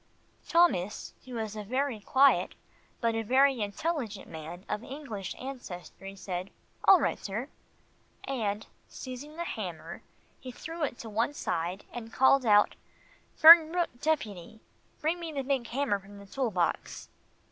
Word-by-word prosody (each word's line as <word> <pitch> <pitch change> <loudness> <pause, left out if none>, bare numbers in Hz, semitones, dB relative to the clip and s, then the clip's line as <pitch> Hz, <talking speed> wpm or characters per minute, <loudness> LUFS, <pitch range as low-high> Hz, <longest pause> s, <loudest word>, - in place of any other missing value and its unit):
Thomas, 330 - +2
who 250 -2 -7
is 220 -1 -4
a 210 - -5
very 255 +2 -1
quiet, 265 +6 +3 0.5
but 230 -1 +2
a 225 - -1
very 260 +2 +3
intelligent, 220 - -3
man 165 +4 -9
of 210 +2 -3
English 245 - -6
ancestry, 195 -7 -8
said, 185 -1 -5 0.4
"All 385 -2 +8
right, - - 0
sir," 220 +8 -4 0.7
and 220 -5 -2 0.2
seizing 260 +4 -8
the 340 - -3
hammer, - - -6 0.4
he 255 - -8
threw 325 +6 -8
it 260 -4 -2
to 225 - -8
one 230 +7 0
side 175 -1 -3
and 230 -2 -7
called 265 0 +4
out, 205 -1 +5 0.7
"Fernbrook 330 -4 +7
Deputy, 220 - -2 0.4
bring 325 +3 0
me 335 -2 -5
the 280 -3 -3
big 265 -3 -1
hammer 245 -5 0
from 200 +1 -14
the 200 - -12
tool 255 +4 -2
box." 180 -5 -2
240 Hz, 145 wpm, -29 LUFS, 205-280 Hz, 0.7 s, All